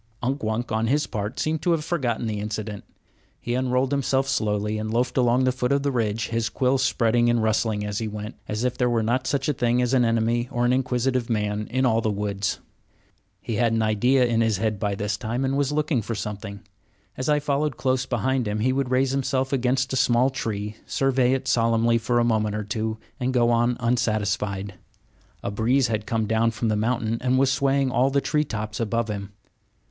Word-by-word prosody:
Unk 135 +3 -1
Wunk, 110 +2 -2
on 110 +1 0
his 145 +4 +2
part, 105 0 -4
seemed 155 0 -1
to 180 - 0
have 155 -2 -1
forgotten 125 -9 -1
the 105 -2 -2
incident. 105 0 -4 0.6
He 120 - -3
unrolled 130 +1 +1
himself 135 -1 +1
slowly 105 -3 0
and 110 0 -3
loafed 120 +2 0
along 125 0 +3
the 130 - +3
foot 125 0 -2
of 140 0 +2
the 140 - +1
ridge, 110 -3 -1
his 115 -1 -1
quills 130 +3 +1
spreading 120 -2 +2
and 120 -1 +2
rustling 110 -1 0
as 105 0 -3
he 110 - -2
went, 105 +1 -6
as 105 +2 -2
if 125 -1 0
there 125 -1 +1
were 115 -2 +1
not 130 +4 0
such 140 -1 0
a 150 - +2
thing 120 -1 +1
as 125 +1 +1
an 130 -2 +4
enemy 115 +1 +1
or 120 0 0
an 125 - +3
inquisitive 130 -1 0
man 105 -1 -1
in 130 +2 +1
all 115 -2 +3
the 110 - 0
woods. 100 -1 -2 0.9
He 115 - -3
had 115 -1 +2
an 115 -1 +1
idea 125 +5 +3
in 115 -1 +1
his 110 -3 +2
head 110 -1 -1
by 100 -1 -1
this 105 +1 -2
time 120 +4 -2
and 135 +1 0
was 140 0 +1
looking 150 -4 0
for 115 +2 -4
something. 100 -1 -6 0.5
As 130 +3 -3
I 150 0 +4
followed 145 -1 -1
close 130 -1 0
behind 125 0 0
him, 105 +1 -2
he 130 +3 +2
would 135 -1 -1
raise 130 +1 +2
himself 135 0 -1
against 130 +1 +1
a - - +1
small 125 +1 +3
tree, 105 -5 -4
survey 130 -2 +2
it 135 - -2
solemnly 115 0 +2
for 120 +2 0
a 120 - +4
moment 110 -3 +1
or 105 - -2
two, 110 +1 -3 0.2
and 130 0 0
go 120 -1 +4
on 120 +1 +2
unsatisfied. 105 -4 -1 0.7
A - - -2
breeze 120 +5 +2
had 110 -2 -2
come 110 -1 0
down 110 +2 +2
from 115 0 -2
the 110 - +1
mountain 115 +1 0
and 130 0 +2
was 135 0 +3
swaying 135 -1 +1
all 130 +1 +3
the 140 +1 +2
tree 150 +2 0
tops 105 -5 -5
above 115 0 0
him. 100 -1 -5
120 Hz, 215 wpm, -24 LUFS, 110-130 Hz, 0.9 s, an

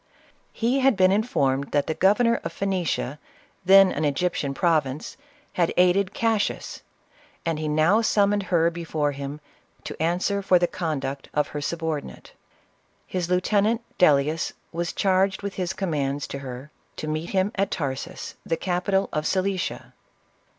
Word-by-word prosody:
He 245 +4 0
had 265 -5 +3
been 185 0 +5
informed 140 - 0
that 145 -1 +2
the 160 - -1
governor 230 +7 +3
of 165 - -4
Phoenicia, 175 -7 -2 0.4
then 195 +1 +7
an 155 - -2
Egyptian 145 -1 -1
province, 155 -5 0 0.4
had 170 -2 +1
aided 180 +2 +3
Cassius, 225 -3 -1 0.6
and 165 -2 -1
he 155 - -2
now 155 +8 +3
summoned 205 -2 +2
her 170 -2 +3
before 160 -3 -2
him, 140 +1 -6 0.4
to - - -7
answer 180 +5 0
for 190 -2 +4
the 175 - +2
conduct 140 -6 -4
of 150 - +1
her 150 - -5
subordinate. 160 -1 -4 0.7
His 180 -2 -3
• - - -14
lieutenant, 205 +5 +2 0.2
Dellius, 150 -1 +3 0.2
was 170 0 -2
charged 195 0 +1
with 200 -1 -3
his 180 -2 -2
commands 145 -7 -2
to 140 - -5
her, 130 +2 -8 0.2
to 155 - -5
meet 155 +2 -3
him 195 +1 +1
at 195 0 0
Tarsus, 135 -5 -4
the 165 - -1
capital 190 +2 0
of 150 0 -1
Cilicia. 190 -1 -2
175 Hz, 150 wpm, -24 LUFS, 150-195 Hz, 0.7 s, then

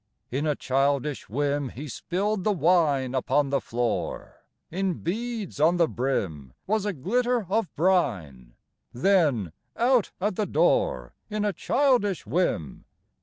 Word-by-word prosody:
In 140 +5 -1
a 150 - +1
childish 140 +2 0
whim, 140 +3 -1
He 140 +6 -8
spilled 190 - -2
the 215 - +2
wine 155 -7 +2
Upon 135 +2 +1
the 140 - +1
floor, 120 -1 -3 0.3
In 190 0 -1
beads 215 -1 -4
on 165 +4 +4
the 170 -2 +4
brim 90 - -2
Was 210 0 0
a 205 - -1
glitter 240 - 0
of 195 -2 0
brine, 90 - 0 0.4
Then, 140 - +2 0.3
out 245 -2 +3
at 195 0 -1
the 210 - 0
door - - +1 0.2
In 210 0 -1
a 205 - 0
childish 240 - +1
whim! 115 - -1
160 Hz, 135 wpm, -26 LUFS, 130-200 Hz, 0.4 s, on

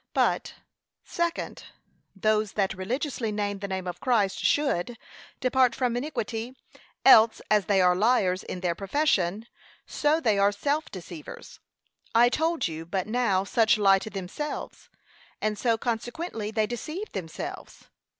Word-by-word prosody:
But, - - +1 0.5
Second, 340 -1 -3 0.5
Those 215 +1 +1
that 195 -2 0
religiously 230 +4 -3
name 205 -1 -2
the 200 - -4
name 190 -1 -4
of 180 -1 -5
Christ 215 -7 +1
should 245 -6 +1 0.4
depart 255 -1 +3
from 250 -3 0
iniquity, 245 -3 -4 0.5
else, 225 -4 +7
as 210 -3 +4
they 195 -2 +3
are 180 0 +5
liars 190 -3 +2
in 180 - -7
their 175 -2 0
profession, 200 - 0 0.4
so 300 +2 +1
they 215 -9 +2
are 200 +1 +4
self 285 +9 -1
deceivers. 170 -4 -10 0.6
I 240 +1 +6
told 320 - 0
you 160 0 -6
but 185 +3 -2
now 215 -5 +1
such 225 +2 +3
lie 195 -2 +5
to 220 - -7
themselves, 195 +10 -6 0.5
and 215 0 -1
so 230 +2 +1
consequently 235 +1 -3
they 220 0 +1
deceive 310 - -5
themselves. 170 -5 -7
215 Hz, 140 wpm, -27 LUFS, 195-250 Hz, 0.6 s, else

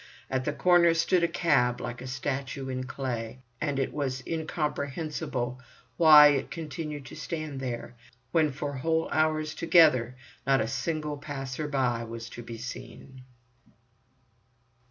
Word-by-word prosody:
At 130 -1 0
the 150 - +1
corner 170 +1 +4
stood 170 +2 +2
a - - +4
cab 140 -8 +2
like 120 +1 -5
a 130 - -7
statue 135 +1 -3
in 130 0 -3
clay, 130 -2 -5 0.2
and 145 -2 -1
it 135 - -1
was 130 -3 -2
incomprehensible 150 -5 -3 0.3
why 150 -3 +9
it 140 -2 0
continued 150 -3 -6
to - - -10
stand 155 -3 -5
there, 120 -2 -5 0.4
when 155 -3 +3
for 140 +1 -4
whole 160 +4 0
hours 155 0 +1
together 155 -8 +4 0.3
not 135 -1 +4
a 110 - 0
single 150 +4 -2
passer 140 0 -5
by 125 -5 0
was 115 0 -7
to 120 - -8
be 115 -1 -8
seen. 130 +2 -9
140 Hz, 140 wpm, -28 LUFS, 130-155 Hz, 0.4 s, why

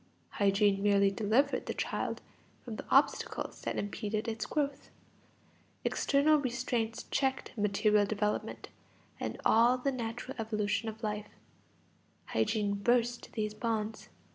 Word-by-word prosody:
Hygiene 200 0 +2
merely 200 -1 +4
delivered 225 +8 +1
the - - -3
child - - -2 0.4
from - - -5
the - - -7
obstacles - - +2
that - - -3
impeded 210 +2 -2
its 225 -1 -3
growth. 285 -2 -2 1.0
External 290 +2 +3
restraints 240 -3 -2
checked 265 -1 0
material 210 0 +3
development 210 0 -2 0.5
and - - -4
all 235 +3 +5
the 275 +2 0
natural 245 +1 -5
evolution 215 0 -1
of 220 +1 -10
life; 210 -1 -3 1.0
hygiene 200 - 0
burst 240 +3 +1
these 215 -2 -2
bonds. 220 -1 -3
220 Hz, 115 wpm, -32 LUFS, 210-245 Hz, 1.0 s, all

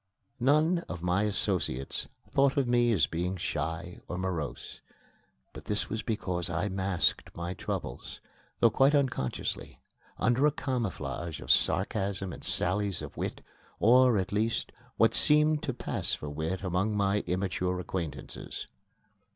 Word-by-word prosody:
None 155 +7 +3
of 85 -2 -6
my 90 +4 +2
associates 90 -9 -1 0.2
thought 135 0 +3
of 135 -3 +2
me 120 0 +3
as 90 -8 +4
being 90 +3 -2
shy 80 +1 -3
or 90 - -4
morose. 80 -8 -4 0.7
But - - -10
this 105 0 -2
was 110 0 -1
because 95 -6 +1
I 85 +4 -1
masked 95 -2 0
my 85 +1 -4
troubles, - - -5 0.4
though 115 - +6
quite 135 +6 +4
unconsciously, 130 - -1 0.4
under 125 +5 +3
a - - +3
camouflage 90 - -3
of - - 0
sarcasm 95 -2 +2
and - - -10
sallies 95 -2 +1
of 75 - -8
wit, - - -4 0.4
or, 125 0 +6
at 95 -1 -1
least, 110 +3 0 0.3
what - - +4
seemed 150 0 +4
to 160 - -2
pass - - -2
for 75 - -7
wit 80 +6 -3
among 95 +3 0
my 100 0 +2
immature 90 0 -1
acquaintances. 85 -4 -5
95 Hz, 140 wpm, -29 LUFS, 85-120 Hz, 0.7 s, though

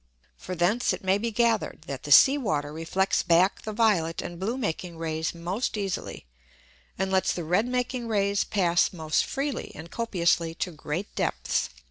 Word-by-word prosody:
For 185 - -6
thence 190 +8 +2
it - - -6
may 190 +1 +2
be 230 +2 -1
gather'd, 230 +1 0
that - - -5
the - - -5
Sea 275 0 +8
Water 150 - -2
reflects 175 +5 0
back 175 +2 +3
the 215 - -5
violet 205 -7 +2
and 175 -1 -6
blue 220 +7 -2
making 180 -7 -3
Rays 160 0 -2
most 185 +8 -2
easily, 195 - -4 0.7
and 190 +1 -1
lets 190 -1 +2
the 175 - -4
red 180 +8 +1
making 250 -1 -2
Rays 200 -2 +1
pass 175 -4 +2
most 160 -3 0
freely 275 -1 -3
and 160 +2 -10
copiously 170 -7 0
to 180 - -3
great 160 +5 -5
Depths. - - -1
190 Hz, 170 wpm, -27 LUFS, 170-220 Hz, 0.7 s, Sea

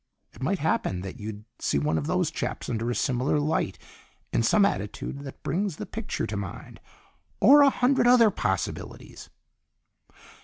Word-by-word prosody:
It - - -15
might 185 +9 0
happen 140 - -1
that 95 0 -8
you'd 105 0 -7
see - - 0
one 75 +2 0
of 75 - -4
these - - 0
chaps - - -4
under 115 0 -2
a 120 - -1
similar 130 +3 +1
light 145 -10 -1 0.6
in - - +2
some 200 - +4
attitude 105 - -3
that 140 -1 -10
brings 185 +3 -1
the - - -6
picture 225 -1 -4
to 105 - -4
mind 100 -3 -7 0.6
or 280 +8 +8
a 285 - +7
hundred 255 -1 +2
other 240 -3 +6
possibilities." - - -4
135 Hz, 160 wpm, -26 LUFS, -, 0.6 s, or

